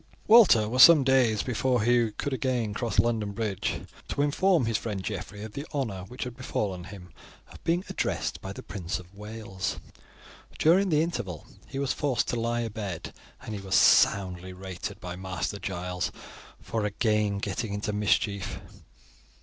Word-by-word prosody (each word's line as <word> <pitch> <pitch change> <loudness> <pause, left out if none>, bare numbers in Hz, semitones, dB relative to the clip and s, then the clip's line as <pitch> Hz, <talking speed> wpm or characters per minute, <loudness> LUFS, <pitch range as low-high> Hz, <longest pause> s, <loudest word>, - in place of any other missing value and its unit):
Walter 210 - +7
was 125 +4 +3
some 165 -5 +9
days 130 -5 +3
before 125 -1 +1
he 120 -1 +3
could 145 - -3
again 125 -4 -1
cross 115 +2 -3
London 110 -3 +1
Bridge 105 -3 -2 0.3
to 140 - 0
inform 165 0 +3
his 115 0 -1
friend 100 -4 -4
Geoffrey 100 0 -5
of 110 -1 -8
the 140 - -5
honour 105 -10 -2
which 125 +5 -6
had 125 -2 -6
befallen 100 -8 -3
him 90 -4 -11 0.4
of - - -14
being 170 +2 +1
addressed - - -2
by 95 - -6
the - - -9
Prince 90 -4 -4
of 90 +1 -13
Wales. 100 -6 -5 0.8
During 185 +5 +4
the 155 -1 +3
interval 115 - -4 0.2
he - - -7
was 140 -1 0
forced 140 -5 0
to 120 - -1
lie 120 +1 0
abed, 105 -6 -5 0.3
and 110 - -7
he 100 - -5
was 95 -1 -1
soundly 95 -2 +4
rated 95 -1 -7
by 90 0 -6
Master 95 +2 -4
Giles 90 -1 -3 0.5
for 110 -2 -3
again 105 0 +1
getting 100 +2 -3
into 105 +1 -2
mischief. 100 -1 0
105 Hz, 165 wpm, -27 LUFS, 95-125 Hz, 0.8 s, some